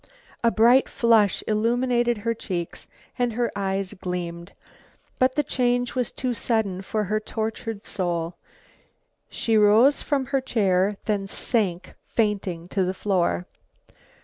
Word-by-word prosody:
A 235 - +5
bright 235 +4 +4
flush 225 -4 +3
illumined 240 +3 +1
her 230 +3 -1
cheeks 175 -6 -5 0.3
and 245 -2 +1
her 240 +1 0
eyes 195 -1 -2
gleamed. 175 -1 -5 0.7
But 255 0 +3
the 295 - +2
change 245 -1 0
was 250 -3 -1
too 255 -2 -2
sudden 220 -6 -1
for 215 +2 -2
her 210 +2 0
tortured 220 0 -4
soul. 175 -3 -2 1.0
She 225 - -1
rose 215 +7 +5
from 275 -3 0
her 270 - +3
chair, 200 -5 +1
then 200 -2 -1
sank 195 -4 -1
fainting 195 -6 -1
to 195 -1 0
the 185 +1 -2
floor. 175 - 0
215 Hz, 130 wpm, -24 LUFS, 190-240 Hz, 1.0 s, A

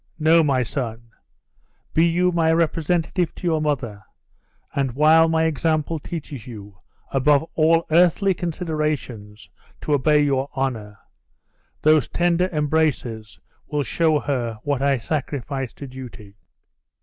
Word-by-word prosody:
No, 160 +1 +4
my 135 -5 +1
son! 115 -2 -5 0.8
Be 165 +2 +4
you 180 +2 +2
my 165 -2 +2
representative 165 +1 0
to - - -13
your 160 -3 +1
mother; 130 -9 -2 0.7
and 135 -3 -1
while 160 +4 +5
my 160 0 +2
example 160 0 0
teaches 145 -6 -7
you, 100 -5 -11 0.3
above 140 +3 +2
all 165 +1 +3
earthly 180 +4 +4
considerations, 150 - -4 0.3
to 150 - -1
obey 150 +1 +3
your 135 -1 0
honor, 115 -6 -3 0.9
those 155 -4 +4
tender 175 +1 +1
embraces 150 - -1 0.3
will 150 -1 -1
show 160 0 +1
her 120 -6 -2
what 140 -2 -1
I 140 -1 +2
sacrifice 135 -1 -4
to 140 - -9
duty." 125 -6 -11
150 Hz, 125 wpm, -22 LUFS, 130-160 Hz, 0.9 s, while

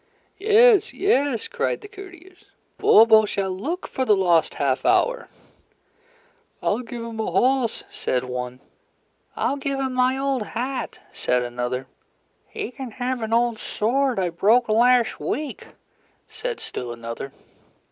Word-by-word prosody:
"Yes! 435 0 +5
Yes!" 285 - +1
cried 480 0 -2
the 415 - -10
courtiers. 375 -3 -14 0.3
"Bobo 220 0 +6
shall 195 -2 -2
look 295 - -4
for 260 - -2
the 215 -5 +4
lost 175 -4 +2
half 135 -2 0
hour." - - +2 1.3
"I'll 210 - 0
give 240 -1 -7
him 230 -1 -7
a 220 - -1
horse," 255 -2 +1
said 125 -1 -2
one. 125 0 -5 0.7
"I'll 280 - -1
give 275 0 -3
him 265 -1 -2
my 255 +1 +2
old 270 -2 -1
hat," 250 +5 -4
said 125 0 0
another. 125 +1 -3 0.6
"He - - -6
can 265 -1 -7
have 250 0 -3
an 220 0 -4
old 235 -1 +1
sword 255 +4 0
I 185 -2 0
broke 220 +8 +3
last 240 +2 +3
week," 300 -1 -4 0.6
said 460 +1 -5
still 120 -1 -6
another. 115 +3 -7
245 Hz, 135 wpm, -23 LUFS, 190-275 Hz, 1.3 s, Bobo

